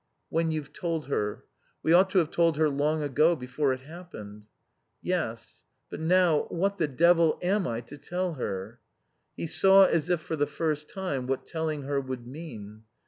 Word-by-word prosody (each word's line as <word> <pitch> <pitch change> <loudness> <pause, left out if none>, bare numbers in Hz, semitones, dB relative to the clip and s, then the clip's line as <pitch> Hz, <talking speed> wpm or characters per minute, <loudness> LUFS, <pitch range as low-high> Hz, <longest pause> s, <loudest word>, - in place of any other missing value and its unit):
"When 165 0 +1
you've 150 -2 -4
told 165 -2 -3
her. 105 -6 -2 0.4
We 160 - +3
ought 185 +2 +6
to 190 - 0
have 165 -3 +3
told 165 -3 +2
her 155 -1 +3
long 150 +2 0
ago, 155 +4 +3
before 135 +1 -1
it 130 0 -3
happened." 120 - -11 0.5
"Yes. 135 -11 -3 0.3
But - - -6
now 170 -1 +3
what 195 +3 -1
the 160 - +2
devil 165 +3 +4
am 190 +1 +1
I 115 0 -2
to 145 +5 -12
tell 180 +3 -2
her?" 110 -3 -5 0.6
He - - -3
saw, 195 +4 +6
as 165 -2 +1
if 175 -2 +2
for 160 - -4
the 145 -1 +1
first 150 0 -2
time, 145 -10 -3
what 135 0 -2
telling 160 -3 -3
her 140 0 -1
would 130 -2 -6
mean. 115 -7 -9
155 Hz, 180 wpm, -28 LUFS, 130-170 Hz, 0.6 s, ought